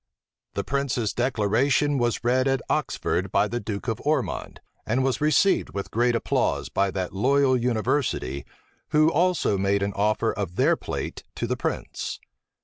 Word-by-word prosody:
The - - -1
prince's 130 -5 -1
declaration 130 +4 +1
was 120 -2 0
read 130 +2 +2
at 135 -1 +1
Oxford 95 +1 -1
by 100 +1 +3
the 120 +3 -3
duke 105 0 -5
of 115 -1 -2
Ormond, 155 +2 -1 0.2
and 125 +4 0
was 135 +1 0
received 155 - +2
with 100 - -4
great 120 +1 +2
applause 115 - 0
by 100 0 +1
that 95 -1 -3
loyal 130 +6 +3
university, 120 - 0 0.4
who 155 +1 +4
also 170 - +2
made 100 +1 +1
an 100 0 -1
offer 105 +3 +1
of 100 -4 -4
their - - +4
plate - - -5
to - - -2
the - - -1
prince. - - -4
120 Hz, 155 wpm, -25 LUFS, 100-135 Hz, 0.4 s, who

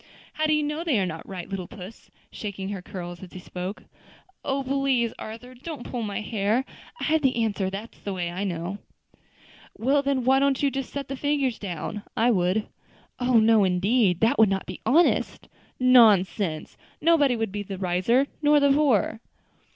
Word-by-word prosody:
"How 310 0 0
do 310 - +3
you 300 0 +2
know 300 +3 -2
they 295 -11 +1
are 190 - +1
not 165 -2 -7
right, 185 -3 -6
little 190 -3 -5
puss?" 205 0 -11 0.2
shaking 195 -2 -5
her 200 -2 -5
curls 175 -3 -8
as 190 - -11
he 185 - -7
spoke. 180 +3 -6 0.6
"Oh! 275 0 -1
please, 265 -3 +1
Arthur, 230 +4 -8
don't 270 +1 -8
pull 245 - -5
my 210 -1 -3
hair. 215 +4 0 0.3
I - - -5
have 315 0 +2
the 265 -2 +2
answer 200 -3 -1
that's 200 +4 -8
the 200 - -5
way 175 -2 -3
I 185 +3 -4
know." 180 +1 -4 1.0
"Well, 275 +5 +2
then, 275 -2 0
why 265 +2 +4
don't 275 0 +1
you 280 - +3
just 270 -1 -4
set 280 -2 -5
the 275 - -4
figures 275 -3 0
down. 190 +1 -5 0.2
I 235 +2 +4
would." 185 +1 +1 0.5
"Oh! 250 -1 +3
no, 220 -1 +5
indeed; 190 +1 +2
that 225 0 +3
would 220 -2 +6
not 195 -1 -1
be 185 - -8
honest." 330 +6 +2
"Pooh! - - -21 0.4
nonsense! 205 -8 +4 0.2
nobody 295 -6 +4
would 225 -3 -2
be 205 +1 -4
the 195 -1 -6
wiser, 185 +8 +2 0.2
nor 295 0 +5
the 285 -1 +4
poorer." 265 - +2
225 Hz, 190 wpm, -25 LUFS, 190-270 Hz, 1.0 s, would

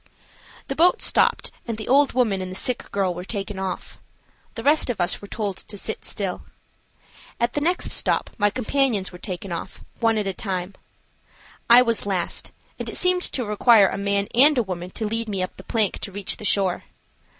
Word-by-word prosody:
The 270 - -3
boat 350 +4 +4
stopped - - +2 0.2
and 230 -2 -3
the 215 - -6
old 280 +2 +4
woman 220 -7 +1
and 185 - -5
the - - -7
sick 250 +5 -2
girl 195 -3 0
were 175 +1 -7
taken 200 0 -5
off. 190 -1 -5 0.6
The - - -5
rest 295 -1 +4
of 235 - -2
us 175 - 0
were 205 - -9
told 205 -3 -3
to 205 - -8
sit 220 - -4
still. 195 -3 -3 1.0
At 235 +1 0
the 290 - -1
next 350 +4 +1
stop - - +1
my 205 - +4
companions 250 -3 0
were 180 - -11
taken 185 0 -6
off, 170 - -6 0.2
one 225 -1 +2
at 210 - 0
a 195 - -1
time. 185 -1 -4 1.0
I 240 +1 +9
was 230 -4 -1
last, 185 -4 -2 0.3
and - - -3
it - - -2
seemed 360 0 +3
to 255 -8 -2
require 210 -1 +5
a - - -4
man 200 0 0
and 280 +4 +6
a 240 - +3
woman 180 -2 -5
to 220 +4 -4
lead 225 +1 -2
me 195 -3 -1
up 185 - -6
the 190 - -10
plank 220 -3 0
to 200 - -6
reach 200 0 -4
the 215 - -7
shore. 195 -3 +1
205 Hz, 205 wpm, -23 LUFS, 190-240 Hz, 1.0 s, I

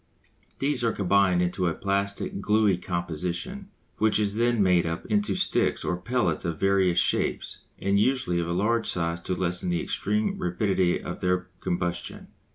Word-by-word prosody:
These 135 -2 -1
are 115 - +3
combined 95 -2 +3
into 90 +1 0
a 80 - -1
plastic, 100 +1 -2
gluey 105 -1 +3
composition, 90 - -4 0.3
which 110 0 +3
is 105 -1 0
then 120 -1 +2
made 90 -2 +4
up 80 0 -4
into 105 -2 0
sticks - - +1
or - - 0
pellets 120 +8 -1
of 85 -3 -3
various 95 -2 +3
shapes, - - +1 0.2
and 100 +1 +1
usually 110 -7 +1
of 85 - -2
large 105 +7 +1
size 85 -1 -1
to 90 +2 -3
lessen 90 0 -1
the 85 -1 +1
extreme 105 +1 -1
rapidity 90 0 +1
of 90 - -6
their 90 0 0
combustion. 85 0 -3
95 Hz, 160 wpm, -26 LUFS, 90-105 Hz, 0.3 s, made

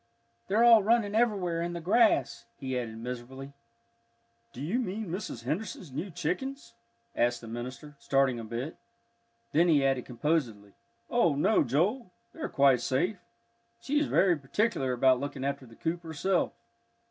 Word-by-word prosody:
"They're 215 +4 +3
all 230 -2 +8
running 215 0 +2
everywhere 200 -7 +1
in 175 0 -3
the 170 - -4
grass," 220 +7 +2
he 130 -2 -4
added 115 -3 -4
miserably. 125 +3 -7 1.0
"Do - - -11
you 175 - -1
mean 215 -3 -3
Mrs. 175 - -5
Henderson's 175 - -4
new 155 +9 -4
chickens?" 265 - -4 0.4
asked 120 0 +1
the 115 - -11
minister, 125 +6 -7
starting 135 -3 +1
a - - -6
bit. 120 +7 -5 0.7
Then 170 +3 +4
he 145 -5 +4
added 135 -2 +1
composedly, 120 -6 -2 0.4
"Oh, 170 - +3
no, 150 +8 +3
Joel, 180 - 0 0.2
they're 325 - -5
quite 135 -3 +4
safe. 175 - 0 0.6
She 275 +5 0
is 295 - 0
very 185 -2 +3
particular 140 - -1
about 130 0 +4
looking 140 -1 -4
after 140 -2 -3
the 115 - -15
coop 170 +5 -3
herself." 170 +3 0
150 Hz, 150 wpm, -29 LUFS, 130-200 Hz, 1.0 s, all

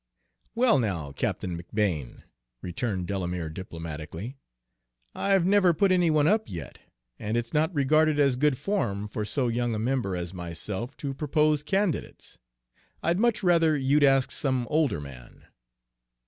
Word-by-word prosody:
"Well, 235 - +4
now, 90 - -2
Captain 90 +5 -2
McBane," 85 - -2 0.4
returned 90 +1 -2
Delamere 90 -3 -3
diplomatically, 80 - -7 0.8
"I've 195 -3 +2
never 185 -3 +4
put 195 +3 +3
any 180 -2 +3
one 155 -1 +3
up 215 +3 +2
yet, 80 -8 -8 0.4
and 110 +2 -2
it's 120 0 -3
not 155 +3 +2
regarded 155 0 +3
as 140 -3 +4
good 140 0 +2
form 120 - -1
for 105 0 -4
so 125 +4 0
young 120 0 -1
a - - -2
member 115 -4 -1
as 90 0 -5
myself 95 +7 -5
to 135 - -2
propose 150 +1 +1
candidates. 190 +1 -2 0.6
I'd 170 +3 +1
much 235 -2 +2
rather 165 -4 +4
you'd 140 +2 +2
ask 135 -1 +4
some 130 -3 0
older 150 - +2
man." 65 -4 -12
130 Hz, 145 wpm, -27 LUFS, 95-155 Hz, 0.8 s, Well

